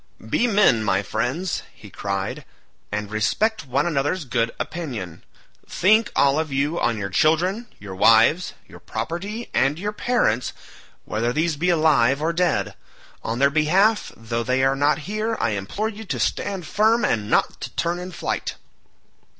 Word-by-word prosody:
"Be 245 - +2
men, 195 - +4
my 100 -1 +1
friends," 155 - -2
he - - -15
cried, 100 +8 -3 0.5
"and 105 0 -3
respect 205 - 0
one 135 +3 +1
another's 155 +1 -1
good 120 -2 0
opinion. 120 - -5 0.5
Think, 215 +4 +3
all 140 +2 +3
of 160 -2 -3
you, 145 +5 0
on 115 -2 +1
your 100 -2 -4
children, 180 - +2
your 100 -2 -9
wives, 115 - +4
your - - -13
property, 200 +8 -5
and 135 +3 +2
your 205 +4 -3
parents 210 - 0 0.5
whether 115 +3 -1
these 155 +4 0
be 170 +5 0
alive 150 -6 +3
or 160 +2 0
dead. 145 - 0 0.5
On 115 - -3
their 140 +2 +3
behalf 185 +9 +2
though 115 +1 -3
they 125 +2 +1
are 135 0 +3
not 145 +2 +2
here, 215 +3 -2
I 110 - +1
implore 105 - -2
you 220 0 -8
to - - -3
stand 195 -4 -1
firm, 220 +7 +2
and 105 -2 -1
not - - +1
to - - -4
turn 170 +1 -1
in 180 +1 -7
flight." - - -3
150 Hz, 160 wpm, -23 LUFS, 115-185 Hz, 0.5 s, men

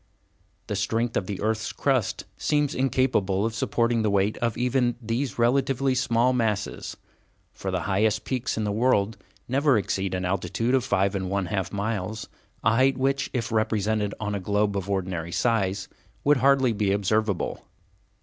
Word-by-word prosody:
The - - -3
strength 115 +1 -1
of 90 - -1
the 100 -2 -4
earth's 110 +1 -1
crust 130 -7 0
seems 145 -2 0
incapable 125 -7 +1
of 115 - -1
supporting 115 0 +1
the 110 - +1
weight 100 +1 +2
of 115 -2 -1
even 125 0 +1
these 120 +3 -2
relatively 130 +2 +2
small 125 -1 +2
masses, 110 -5 -2 0.6
for 95 - -5
the 90 -1 -1
highest 105 +4 +1
peaks 130 -2 -2
in 110 - 0
the 105 - -1
world 110 -1 +2 0.3
never 135 0 +3
exceed 95 -2 -1
an 90 0 -2
altitude 100 +6 -1
of 130 -2 +3
five 100 -6 +1
and 95 -2 -2
one 100 -1 0
half 95 -2 -2
miles, 105 0 -3 0.4
a 115 - +4
height 130 +1 +3
which, 135 +1 0
if 115 -3 -2
represented 110 -1 0
on 105 -1 -2
a 100 - -1
globe 100 +2 0
of 100 0 -3
ordinary 90 -4 -2
size, 100 -3 0 0.4
would 145 0 +4
hardly 135 -2 +4
be 100 -2 0
observable. 100 0 0
110 Hz, 165 wpm, -25 LUFS, 100-125 Hz, 0.6 s, a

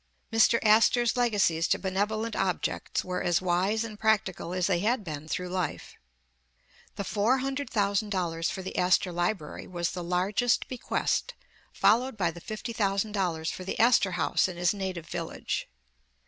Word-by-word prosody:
Mr. 225 +1 +5
Astor 225 +3 +5
's 235 - +1
legacies 205 -9 +2
to - - +2
benevolent 210 +4 -1
objects 190 -2 -1
were 180 0 -2
as 175 -1 +2
wise 185 +5 +1
and 215 -2 -8
practical 215 -6 0
as 180 -1 0
they 185 -3 +2
had 220 +4 +1
been 155 -3 -6
through 180 +3 -3
life. 180 -4 -3 1.0
The 200 - -3
four 215 +6 +2
hundred 275 +2 -3
thousand 205 -1 0
dollars 170 -4 -1
for 190 - -5
the 190 - -6
Astor 180 0 +3
Library 175 -2 -2
was 175 -1 -2
the 180 -1 -5
largest 190 +7 +1
bequest, 255 -2 -1 0.4
followed 245 +1 +2
by 175 -5 +1
the 170 +1 -11
fifty 215 +4 -6
thousand 200 -1 0
dollars 175 -6 -1
for 185 - -7
the 190 - -4
Astorhaus 195 -9 +3
in 180 -2 -7
his 175 +1 +2
native 190 -4 -4
village. 165 -1 -4
195 Hz, 160 wpm, -28 LUFS, 175-220 Hz, 1.0 s, Mr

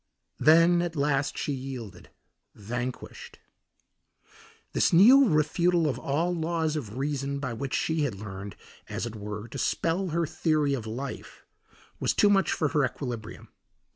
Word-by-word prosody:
Then 165 +2 +5
at 175 -1 -3
last 145 -1 0
she 145 - -2
yielded, 130 -6 -7 0.5
vanquished. 120 +4 -6 1.4
This - - +2
new 245 +10 +7
refutal 170 +2 +2
of 140 - -2
all 165 +6 0
laws 160 -2 -1
of 120 -7 -5
reason 140 0 -2
by 140 -4 -4
which 135 +3 -3
she 160 -1 0
had 140 -8 -1
learned, 100 -1 -8 0.3
as - - -3
it 115 -1 -6
were, 105 +1 -6
to - - -6
spell 175 +4 0
her 170 0 0
theory 155 -2 0
of 120 -5 -4
life, 125 +5 -7 0.5
was - - 0
too 205 - +4
much 195 -1 +3
for 155 - 0
her 145 0 +1
equilibrium. 120 -4 -5
145 Hz, 145 wpm, -27 LUFS, 120-165 Hz, 1.4 s, new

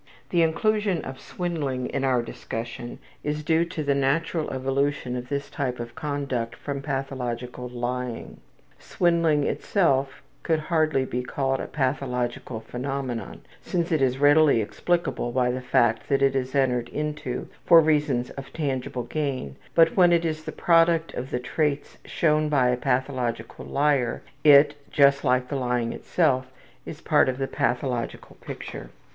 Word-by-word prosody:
The 170 - +3
inclusion 200 +2 +1
of 130 0 -7
swindling 145 -8 -3
in 140 - -2
our 125 -3 +2
discussion 120 +1 -6 0.3
is 150 +1 -2
due 165 +2 +2
to 165 -2 -5
the 140 -1 +2
natural 150 +4 0
evolution 135 0 -1
of 125 0 -6
this 140 0 -2
type 125 -3 -3
of 120 0 -6
conduct 140 -5 -3
from 140 -1 -5
pathological 125 -3 -4
lying. 125 0 -4 0.4
Swindling 165 -4 +2
itself 140 -7 0 0.2
could 160 -2 +1
hardly 155 -4 +1
be 125 -1 -2
called 135 +1 -1
a - - -4
pathological 125 -4 -2
phenomenon, 125 -2 -4 0.2
since 175 -1 -2
it 155 -3 +2
is 130 -1 +2
readily 145 -2 +5
explicable 145 +3 -1
by 125 0 +1
the 130 +1 -3
fact 120 -2 +1
that 140 0 +2
it 135 0 +3
is 130 0 -2
entered 125 -3 +1
into 150 -4 -4 0.2
for 170 -2 +9
reasons 150 -6 +1
of 135 -1 -9
tangible 130 -5 -2
gain, 135 - -3 0.2
but 165 -1 +5
when 180 -2 +6
it 170 -1 +3
is 155 -1 -3
the - - -4
product 165 -1 +3
of 130 +2 -5
the 125 - -2
traits 145 +3 -2
shown 155 -2 +1
by 130 -4 +3
a 125 - +2
pathological 125 -3 -2
liar 140 -4 +1 0.2
it, 145 -1 +7 0.2
just 140 -1 +4
as 125 0 +3
the 135 +3 -5
lying 125 -3 -1
itself, 130 -7 +1 0.4
is 150 - -7
a - - -28
part 150 -3 +4
of 130 - -2
the 135 - -1
pathological 125 -1 -2
picture. - - -8
135 Hz, 155 wpm, -25 LUFS, 125-155 Hz, 0.4 s, for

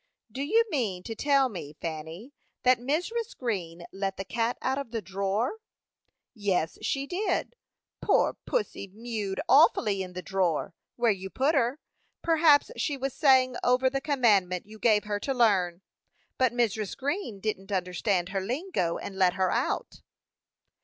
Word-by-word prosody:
"Do 260 +5 -5
you 440 +11 +3
mean 205 -11 -1
to 225 - -5
tell 275 +2 +3
me, 170 - -7
Fanny, 165 - -6 0.3
that 255 -1 +5
Mrs. 350 - -2
Green 175 -9 -3
let 195 0 -3
the 195 - -5
cat 230 +3 -1
out 265 +1 -1
of 280 - -6
the 230 0 -3
drawer?" 200 - -2 0.7
"Yes, 195 -7 -1
she 275 0 -1
did. 370 +4 -1 0.5
Poor - - +3
pussy 425 - -2
mewed 210 -1 -4
awfully 205 - +5
in 185 -1 -6
the 180 0 -6
drawer, 180 -5 0 0.2
where 235 -2 +3
you 190 -1 -4
put 275 +9 +1
her. 260 -1 +1 0.5
Perhaps 320 -3 +4
she 290 - -1
was 270 0 -3
saying 260 -4 +4
over 255 +1 +3
the 275 0 -1
commandment 210 - +2
you 215 +1 -13
gave 215 -2 +3
her 205 -1 -2
to 270 +6 -2
learn; 190 -7 +2 0.6
but 255 -2 +4
Mrs. 220 -4 -1
Green 280 - -3
didn't 200 -1 -4
understand 180 0 0
her 195 -1 -2
lingo, 245 - -1
and 195 - -7
let 180 -2 +4
her 190 -1 +1
out." - - -2
225 Hz, 155 wpm, -28 LUFS, 190-270 Hz, 0.7 s, that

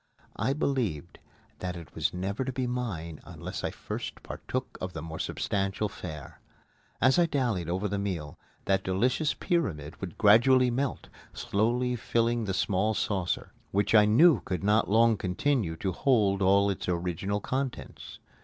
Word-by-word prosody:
I 130 +4 +1
believed 115 - -2 0.4
that 90 -1 -4
it 85 -4 -11
was - - 0
never 95 +7 -3
to 130 - -3
be 130 0 -2
mine 100 -11 -4
unless - - -7
I - - 0
first - - -6
partook - - -5
of - - -4
the - - -5
more 80 -1 -7
substantial 100 +1 -1
fare. 80 -8 -9 0.6
As 130 +7 +4
I 170 - +4
dallied 120 - -1
over 95 +4 -1
the 100 0 -2
meal, 85 -7 -4 0.3
that 95 -1 +1
delicious 125 +11 +1
pyramid 85 - -2
would 90 -4 -6
gradually 125 +4 +5
melt, 135 +2 -2 0.2
slowly 120 +4 0
filling 115 0 0
the 95 - -2
small 100 +3 +1
saucer, 90 0 -2 0.2
which 100 +2 +1
I 105 -1 +7
knew 145 +10 +6
could 90 0 -4
not 105 +1 +3
long 115 +1 +4
continue 95 - 0
to 95 +4 -2
hold 100 -2 +2
all 100 +1 +4
of - - -1
its - - -5
original 90 +3 -1
contents. 130 +3 -4
100 Hz, 160 wpm, -28 LUFS, 90-125 Hz, 0.6 s, I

